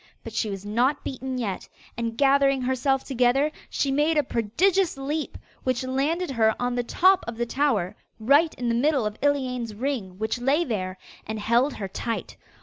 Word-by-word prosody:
But 225 - -8
she 225 -1 -1
was 195 0 -6
not 245 +7 +1
beaten 260 0 -4
yet, 210 -6 -4 0.3
and 230 0 -3
gathering 275 -1 +3
herself 260 +1 +1
together, 265 +3 +2 0.2
she 275 - 0
made 300 +3 +2
a 300 - +4
prodigious 325 - +1
leap, 290 +3 -3 0.3
which 255 -1 0
landed 280 +6 -1
her 220 -3 +3
on 245 0 0
the 245 - 0
top 370 +10 +3
of 230 -1 -5
the 240 - 0
tower, 230 -8 0 0.2
right 285 +8 +4
in 245 - -3
the 235 - +2
middle 270 0 +2
of 210 0 -2
Iliane's 255 -6 0
ring 225 -7 -3
which 220 +3 -2
lay 280 +7 +3
there, 185 -6 -3 0.3
and 220 0 -4
held 235 +6 +2
her 195 - -4
tight. 230 +4 -4
255 Hz, 180 wpm, -25 LUFS, 225-280 Hz, 0.3 s, a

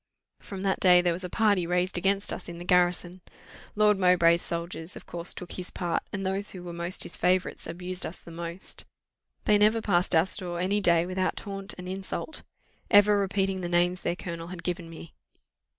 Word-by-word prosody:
"From 195 -2 -8
that 195 -1 0
day 180 -1 +7
there 175 -1 +2
was 180 +3 -4
a 180 - -4
party 205 -4 +2
raised 180 +1 0
against 195 +3 +1
us - - -7
in 170 - -7
the 175 - -8
garrison. 180 0 +1 0.5
Lord 210 -1 +4
Mowbray's 175 -2 +4
soldiers 170 +1 -3
of - - -10
course 170 0 -2
took 180 - -3
his 180 -1 -4
part; 175 -2 -2
and 195 -1 -4
those 195 +2 -1
who 180 -2 -8
were 175 -1 -7
most 170 +2 -1
his - - 0
favourites 185 +1 +1
abused 180 +2 -4
us 170 - -4
the 170 - -13
most. 170 +2 -2 0.6
They 210 -1 +4
never 215 +2 +4
passed 180 -5 +1
our 160 +1 +5
store 180 -2 -3
any 200 +3 +1
day 170 -2 +3
without 185 +1 -1
taunt 195 -1 -5
and 180 0 -8
insult; 190 +11 -5 0.5
ever 205 0 +6
repeating 195 -1 0
the 175 - -3
names 175 +1 +1
their 170 - -1
colonel 170 -2 -6
had 175 -1 -8
given 175 -1 -3
me. 165 0 -11
180 Hz, 200 wpm, -27 LUFS, 175-195 Hz, 0.6 s, day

